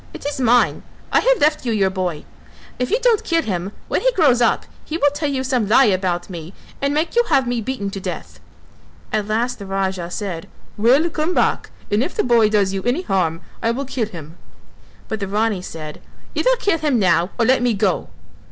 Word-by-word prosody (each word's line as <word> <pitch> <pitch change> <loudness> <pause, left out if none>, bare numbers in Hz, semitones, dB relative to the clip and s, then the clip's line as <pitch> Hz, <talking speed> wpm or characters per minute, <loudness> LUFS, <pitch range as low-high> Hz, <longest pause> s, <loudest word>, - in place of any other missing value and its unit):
it - - -9
is 290 -1 -3
mine; 245 -1 +3 0.3
I - - +5
have - - +3
left 305 +1 +2
you 240 - -1
your 195 -3 +2
boy, 180 -5 -3 0.5
if 250 - -1
you 460 - +2
don't 460 -3 +3
kill 330 -6 +1
him, 185 -1 -3 0.2
when - - 0
he - - +3
grows 275 - +4
up, 235 - +2 0.2
he 320 - -4
will 290 -3 +3
tell 290 +1 -2
you 265 -2 -1
some 250 -5 0
lie 245 +6 +6
about 185 -4 0
me 175 0 -8 0.3
and 280 0 +1
make 310 +7 -1
you 475 - +5
have 265 -2 +3
me 240 -1 -1
beaten 215 -4 -3
to 195 - -5
death." 185 -2 -6 0.7
At 210 -1 0
last 235 +3 -1
the 200 - -8
Raja 190 -2 -2
said 180 -3 -5 0.3
"Well, 250 +10 +4
come 315 +4 -1
back - - +1 0.2
and 210 +4 +2
if 325 - -4
the 430 - +1
boy 235 -3 +4
does 200 -3 +2
you 195 - -2
any 250 - 0
harm 165 - 0 0.2
I 230 - +1
will 260 +4 -1
kill 250 -4 -2
him." 165 -4 -10 0.7
But 220 - -3
the 200 - -3
Rani 210 -1 0
said. 155 -4 -8 0.3
"Either - - +2
kill 400 -8 +1
him 295 -5 +1
now 175 -3 +3
or 235 - +2
let 260 +1 +3
me 245 -3 +2
go." 200 -2 0
225 Hz, 215 wpm, -20 LUFS, 190-275 Hz, 0.7 s, lie